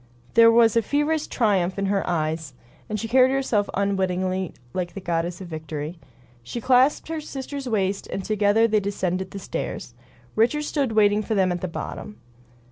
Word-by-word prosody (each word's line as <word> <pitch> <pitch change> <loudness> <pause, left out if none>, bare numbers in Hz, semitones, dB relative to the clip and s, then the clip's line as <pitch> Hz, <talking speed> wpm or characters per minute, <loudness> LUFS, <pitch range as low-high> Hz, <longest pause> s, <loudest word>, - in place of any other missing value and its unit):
There 230 0 +7
was 230 -1 +5
a 230 - +5
feverish 295 +6 0
triumph 195 -6 +1
in 200 - 0
her 195 0 +1
eyes, 155 -4 -2 0.3
and 215 0 -2
she 225 - -3
carried 255 +2 +5
herself 260 -6 0
unwittingly 185 -2 0 0.2
like 180 +1 -3
a - - -2
goddess 170 0 -2
of 185 - -7
Victory. 155 0 -6 0.4
She 120 - -6
clasped 255 +4 +3
her 325 -1 -3
sister's 275 -2 -6
waist, 195 -3 -1
and 195 - -5
together 215 +1 +3
they 215 -1 +2
descended 190 -2 -2
the 200 - -8
stairs. 185 -9 -5 0.4
Richards 270 +7 +2
stood 275 -6 -1
waiting 210 -1 +4
for 220 +1 -2
them 190 -2 +3
at 175 -1 -3
the 185 - -2
bottom. 210 +4 -6
205 Hz, 175 wpm, -24 LUFS, 185-230 Hz, 0.4 s, There